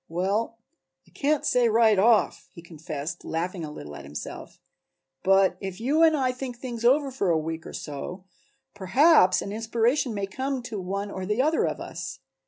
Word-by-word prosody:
"Well, 200 Hz, +7 st, -1 dB, 0.5 s
I -, -, -23 dB
can't 295 Hz, +1 st, 0 dB
say 245 Hz, -2 st, +3 dB
right 220 Hz, -2 st, +4 dB
off," 215 Hz, -2 st, +3 dB
he 170 Hz, -, -11 dB
confessed, 160 Hz, -1 st, -6 dB
laughing 170 Hz, +2 st, -3 dB
a 155 Hz, -, -5 dB
little 75 Hz, -, -9 dB
at 70 Hz, -, -9 dB
himself, 70 Hz, +2 st, -8 dB, 0.6 s
"but 195 Hz, -1 st, +3 dB
if 190 Hz, -2 st, -6 dB
you 280 Hz, +8 st, +1 dB
and 320 Hz, -2 st, +5 dB
I 260 Hz, -2 st, +1 dB
think 250 Hz, -1 st, -6 dB
things 240 Hz, -2 st, -6 dB
over 270 Hz, +3 st, +3 dB
for 225 Hz, -8 st, -1 dB
a 165 Hz, -, +3 dB
week 160 Hz, +1 st, -4 dB
or -, -, -9 dB
so, 155 Hz, +6 st, -6 dB, 0.5 s
perhaps 205 Hz, -, +4 dB
an 200 Hz, -, -6 dB
inspiration 230 Hz, +3 st, 0 dB
may 200 Hz, -1 st, -1 dB
come 260 Hz, +5 st, -3 dB
to 225 Hz, -4 st, -5 dB
one 200 Hz, +2 st, -4 dB
or 190 Hz, -1 st, -5 dB
the 210 Hz, +5 st, +1 dB
other 315 Hz, +2 st, +2 dB
of -, -, -3 dB
us. -, -, -6 dB
205 Hz, 185 wpm, -26 LUFS, 180-250 Hz, 0.6 s, and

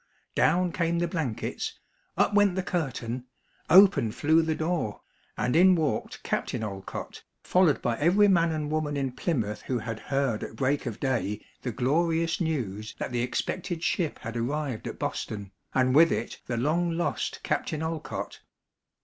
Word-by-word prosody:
Down 180 Hz, 0 st, +3 dB
came 170 Hz, 0 st, 0 dB
the 175 Hz, 0 st, +1 dB
blankets; 130 Hz, -, -3 dB, 0.4 s
up -, -, +3 dB
went 205 Hz, -3 st, +4 dB
the 190 Hz, -, -1 dB
curtain; 130 Hz, -9 st, -3 dB, 0.4 s
open 185 Hz, -, +7 dB
flew 160 Hz, +7 st, +3 dB
the 160 Hz, -1 st, 0 dB
door, 160 Hz, -10 st, -2 dB, 0.4 s
and 125 Hz, -, 0 dB
in 185 Hz, +2 st, +7 dB
walked 155 Hz, -5 st, -2 dB
Captain -, -, -2 dB
Olcott, 100 Hz, -3 st, -6 dB, 0.2 s
followed 180 Hz, -6 st, +3 dB
by 115 Hz, -1 st, 0 dB
every 190 Hz, +7 st, +5 dB
man 170 Hz, -4 st, +4 dB
and 150 Hz, -1 st, -2 dB
woman 155 Hz, -2 st, -1 dB
in 135 Hz, -2 st, -1 dB
Plymouth 120 Hz, -, -2 dB
who 130 Hz, -, -2 dB
had 110 Hz, -1 st, -4 dB
heard 135 Hz, -5 st, -1 dB
at -, -, -7 dB
break 135 Hz, +3 st, 0 dB
of 115 Hz, -2 st, -5 dB
day 120 Hz, -6 st, -1 dB, 0.2 s
the 125 Hz, -, -3 dB
glorious 165 Hz, -, +1 dB
news 115 Hz, -, -2 dB
that -, -, -4 dB
the 120 Hz, -1 st, 0 dB
expected 170 Hz, +7 st, -2 dB
ship 170 Hz, -4 st, 0 dB
had 115 Hz, 0 st, -7 dB
arrived 130 Hz, +1 st, -2 dB
at -, -, -6 dB
Boston, 100 Hz, -3 st, -4 dB, 0.2 s
and 130 Hz, -1 st, +3 dB
with 165 Hz, +3 st, +7 dB
it 115 Hz, -, -3 dB
the 120 Hz, -, -2 dB
long 160 Hz, +8 st, +1 dB
lost 175 Hz, -, -1 dB
Captain 155 Hz, 0 st, -1 dB
Olcott. 160 Hz, -1 st, -4 dB
150 Hz, 160 wpm, -27 LUFS, 120-170 Hz, 0.4 s, open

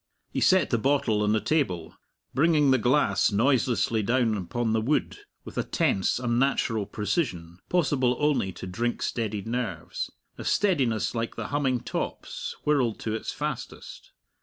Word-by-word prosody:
He -, -, -2 dB
set 185 Hz, -4 st, +4 dB
the 120 Hz, -, +2 dB
bottle 120 Hz, -5 st, +2 dB
on 105 Hz, 0 st, +2 dB
the 110 Hz, -, +3 dB
table, 105 Hz, -, -1 dB, 0.4 s
bringing 150 Hz, -1 st, +4 dB
the 130 Hz, -, +4 dB
glass 115 Hz, -7 st, +3 dB
noiselessly 115 Hz, 0 st, +2 dB
down 115 Hz, 0 st, +2 dB
upon 110 Hz, +5 st, -2 dB
the 110 Hz, -, +2 dB
wood, 145 Hz, -, 0 dB, 0.3 s
with -, -, -5 dB
a -, -, +1 dB
tense, 130 Hz, -, +1 dB
unnatural 120 Hz, -3 st, +1 dB
precision 100 Hz, -, -2 dB
possible 140 Hz, -8 st, +2 dB
only 150 Hz, -10 st, +1 dB
to -, -, -8 dB
drink 120 Hz, +6 st, -2 dB
steadied 110 Hz, -3 st, -2 dB
nerves 120 Hz, +1 st, -3 dB, 0.3 s
a -, -, -5 dB
steadiness 125 Hz, -, +1 dB
like 115 Hz, -1 st, -3 dB
the -, -, -5 dB
humming 135 Hz, -4 st, 0 dB
top's -, -, -4 dB
whirled 135 Hz, -7 st, +2 dB
to 110 Hz, -, -2 dB
its 110 Hz, -, -3 dB
fastest. -, -, -6 dB
120 Hz, 150 wpm, -27 LUFS, 110-140 Hz, 0.4 s, set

